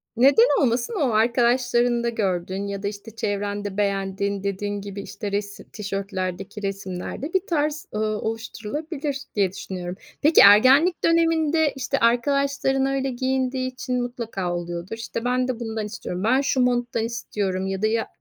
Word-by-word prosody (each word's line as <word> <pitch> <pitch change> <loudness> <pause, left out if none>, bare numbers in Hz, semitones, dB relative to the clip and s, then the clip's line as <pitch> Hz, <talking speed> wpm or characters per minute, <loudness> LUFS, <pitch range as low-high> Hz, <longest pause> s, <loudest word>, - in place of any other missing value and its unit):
Neden 280 - +5
olmasın, 245 - +1
o 255 -4 +2
arkadaşlarında 240 +1 +2
gördüğün 190 -2 -2
ya 200 0 -5
da, - - 0
işte, 210 +2 -8
çevrende 205 -1 -3
beğendiğin 200 0 -1
dediğin 200 +1 -2
gibi, 200 0 -6
işte, 200 +1 -6
resi 200 0 -4
tişörtlerdeki 195 -1 -4
resimlerde 195 - -4
bir 380 +1 +1
tarz, 305 -2 0
ııı, 215 0 -1
oluşturulabilir 275 +7 -4 0.2
diye 195 -3 +2
düşünüyorum. 180 -2 -6 0.3
Peki, 305 +3 +6
ergenlik 260 - +7
döneminde, 325 -2 +3
işte, 270 +1 -1
arkadaşların 270 +3 +2
öyle 270 0 0
giyindiği 260 0 -1
için 250 -1 -2
mutlaka 230 -7 -3
oluyordur. 175 +4 -5
İşte, 230 +1 -5
ben 250 0 +1
de 250 -2 -3
bundan 220 -2 -3
istiyorum. 190 -3 -5
"Ben 255 +5 +3
şu 275 -2 0
monttan 245 -2 +1
istiyorum." 200 -5 -2
ya 195 +1 -3
da 215 - +3
ya 225 0 0
225 Hz, 145 wpm, -24 LUFS, 200-260 Hz, 0.3 s, ergenlik